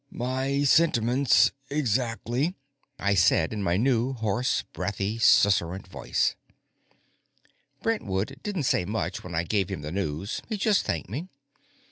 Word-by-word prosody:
"My 130 Hz, +3 st, -1 dB
sentiments 125 Hz, -5 st, +4 dB, 0.2 s
exactly," 130 Hz, -, -1 dB, 0.4 s
I 100 Hz, -, +1 dB
said 85 Hz, -1 st, +3 dB
in 105 Hz, -, -3 dB
my 90 Hz, -2 st, +1 dB
new 125 Hz, +2 st, +1 dB
hoarse, 115 Hz, +1 st, 0 dB
breathy, 100 Hz, +3 st, -3 dB
susurrant 95 Hz, -4 st, +3 dB
voice. 95 Hz, -, -1 dB, 1.5 s
Brentwood 130 Hz, -, -2 dB
didn't 200 Hz, -7 st, -3 dB
say 105 Hz, -, +2 dB
much 105 Hz, +5 st, -3 dB
when 90 Hz, -2 st, -7 dB
I 80 Hz, -, +1 dB
gave 95 Hz, +2 st, 0 dB
him 95 Hz, -6 st, -4 dB
the 75 Hz, +1 st, -6 dB
news; 95 Hz, -, -3 dB
he 215 Hz, -, -2 dB
just 205 Hz, 0 st, +2 dB
thanked 80 Hz, -, -2 dB
me. 155 Hz, -, -5 dB
110 Hz, 130 wpm, -26 LUFS, 95-135 Hz, 1.5 s, sentiments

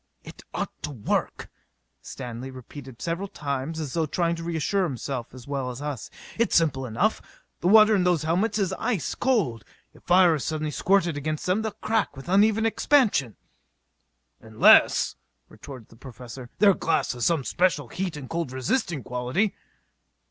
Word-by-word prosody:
"It -, -, -12 dB
ought -, -, -3 dB
to -, -, -4 dB
work," 125 Hz, -8 st, -2 dB, 0.5 s
Stanley, 125 Hz, 0 st, -7 dB
repeated 130 Hz, -1 st, -11 dB
several 170 Hz, +4 st, -2 dB
times 140 Hz, -1 st, -4 dB
as 150 Hz, -5 st, -5 dB
though 165 Hz, -2 st, 0 dB
trying 170 Hz, +2 st, 0 dB
to 165 Hz, -, -7 dB
reassure 170 Hz, +4 st, -1 dB
himself 130 Hz, -5 st, -4 dB
as 125 Hz, 0 st, -13 dB
well 135 Hz, -2 st, -3 dB
as 125 Hz, 0 st, -7 dB
us. 145 Hz, -5 st, -5 dB, 0.3 s
"It's 230 Hz, -, +2 dB
simple 140 Hz, -6 st, +2 dB
enough: 140 Hz, -, 0 dB, 0.4 s
the 175 Hz, -, -1 dB
water 215 Hz, +2 st, +7 dB
in 190 Hz, -, +2 dB
those 175 Hz, -3 st, +2 dB
helmets 195 Hz, +7 st, 0 dB
is 190 Hz, -3 st, 0 dB
ice 225 Hz, -6 st, -1 dB
cold: 195 Hz, -, 0 dB, 0.3 s
if -, -, -19 dB
fire 180 Hz, -1 st, +5 dB
is 150 Hz, -, -2 dB
suddenly 155 Hz, -1 st, -2 dB
squirted 175 Hz, -1 st, +1 dB
against 155 Hz, +1 st, -3 dB
them 185 Hz, +4 st, +1 dB
they'll 220 Hz, -, -2 dB
crack 215 Hz, -5 st, -1 dB
with 135 Hz, -, -9 dB
the 180 Hz, -, -2 dB
uneven 215 Hz, +2 st, +4 dB
expansion." 220 Hz, -, +2 dB, 1.1 s
"Unless," 110 Hz, -1 st, +5 dB, 0.3 s
retorted 130 Hz, -6 st, -11 dB
the -, -, -17 dB
Professor, 125 Hz, 0 st, -10 dB
"their 205 Hz, -2 st, +6 dB
glass 165 Hz, -, 0 dB
has 120 Hz, -2 st, 0 dB
some 165 Hz, -5 st, +1 dB
special 150 Hz, -5 st, 0 dB
heat 180 Hz, -4 st, -4 dB
and 135 Hz, -3 st, -8 dB
cold 165 Hz, -4 st, -3 dB
resisting 135 Hz, -, -1 dB
quality." 125 Hz, -, -1 dB
155 Hz, 165 wpm, -25 LUFS, 130-190 Hz, 1.1 s, water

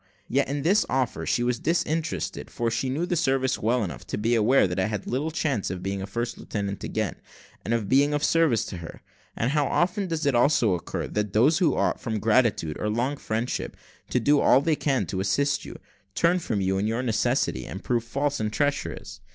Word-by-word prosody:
Yet 140 Hz, +2 st, +1 dB
in 140 Hz, +1 st, -3 dB
this 195 Hz, +7 st, +4 dB
offer 130 Hz, -2 st, -1 dB
she 120 Hz, -, +1 dB
was 120 Hz, -1 st, 0 dB
disinterested, 165 Hz, 0 st, -1 dB
for 120 Hz, -2 st, -2 dB
she 130 Hz, +3 st, -1 dB
knew 150 Hz, +7 st, -1 dB
the 175 Hz, -, -1 dB
service 135 Hz, -5 st, +1 dB
well 120 Hz, +2 st, +1 dB
enough 90 Hz, -, -6 dB
to -, -, -3 dB
be 110 Hz, +3 st, +1 dB
aware 120 Hz, +4 st, +4 dB
that 90 Hz, +1 st, -3 dB
I 95 Hz, -, +2 dB
had 105 Hz, -2 st, -4 dB
little 140 Hz, +6 st, -1 dB
chance 145 Hz, -, -1 dB
of 90 Hz, 0 st, -5 dB
being 95 Hz, 0 st, -2 dB
a 95 Hz, -, -5 dB
first 120 Hz, +4 st, -4 dB
lieutenant 100 Hz, -1 st, -4 dB
again, -, -, -2 dB, 0.5 s
and 110 Hz, -, -4 dB
of 115 Hz, -3 st, 0 dB
being 140 Hz, +5 st, +4 dB
of 145 Hz, -, -1 dB
service 160 Hz, -10 st, +3 dB
to 90 Hz, -, -6 dB
her. 85 Hz, -1 st, -9 dB, 0.3 s
And 115 Hz, +3 st, 0 dB
how 145 Hz, -2 st, +2 dB
often 185 Hz, +3 st, 0 dB
does 160 Hz, -3 st, -2 dB
it 140 Hz, -, +3 dB
also 120 Hz, -4 st, +3 dB
occur, 85 Hz, -, -3 dB
that 105 Hz, -1 st, -3 dB
those 145 Hz, -, +4 dB
who 165 Hz, -7 st, +3 dB
ought, -, -, +1 dB
from 110 Hz, -2 st, -3 dB
gratitude 110 Hz, -8 st, +2 dB
or 105 Hz, -, -1 dB
long 120 Hz, +6 st, 0 dB
friendship, 115 Hz, -2 st, -3 dB, 0.3 s
to 125 Hz, -, +1 dB
do 145 Hz, +5 st, +3 dB
all 130 Hz, -, +5 dB
they 155 Hz, +2 st, +1 dB
can 135 Hz, -8 st, 0 dB
to 95 Hz, +3 st, -4 dB
assist 140 Hz, +10 st, 0 dB
you, -, -, -8 dB, 0.4 s
turn 175 Hz, +2 st, +3 dB
from 110 Hz, -, -2 dB
you 95 Hz, 0 st, +1 dB
in 105 Hz, -, 0 dB
your 115 Hz, +3 st, -1 dB
necessity, 105 Hz, -, 0 dB
and -, -, -7 dB
prove 120 Hz, -2 st, 0 dB
false 140 Hz, +5 st, -1 dB
and 110 Hz, -1 st, -1 dB
treacherous! 140 Hz, -, -2 dB
125 Hz, 215 wpm, -26 LUFS, 105-145 Hz, 0.5 s, all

